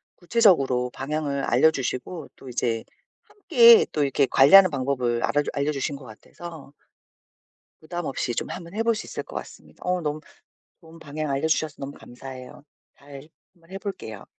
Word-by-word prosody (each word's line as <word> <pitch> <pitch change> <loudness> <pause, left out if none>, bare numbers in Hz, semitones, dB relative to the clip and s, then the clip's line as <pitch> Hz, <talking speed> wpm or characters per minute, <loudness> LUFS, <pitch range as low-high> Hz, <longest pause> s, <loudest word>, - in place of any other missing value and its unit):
구체적으로 165 - +2
방향을 140 0 -3
알려주시고 140 +3 0
또 130 - -12
이제 115 -2 -2 0.4
함께 240 - +6
또 150 - 0
이렇게 140 0 +2
관리하는 185 +10 +7
방법을 130 -3 -1
알아주 145 0 0
알려려주신 140 0 -2
것 135 -2 -11
같아서 150 +6 -12 1.1
부담 175 +1 -6
없이 125 -2 -3
좀 - - -3
한번 170 +1 -8
해볼 225 +1 +1
수 215 - -6
있을 - - -5
것 - - -11
같습니다. - - -10
어 180 0 0
너무 150 -1 -3 0.6
좋은 165 0 -15
방향 150 0 -5
알려주셔서 155 +1 0
너무 140 +1 -6
감사해요. 130 +2 -11 0.3
잘 140 +1 -13 0.2
한번 170 0 -24
해볼게요. 190 - -7
145 Hz, 345 characters per minute, -24 LUFS, 135-170 Hz, 1.1 s, 관리하는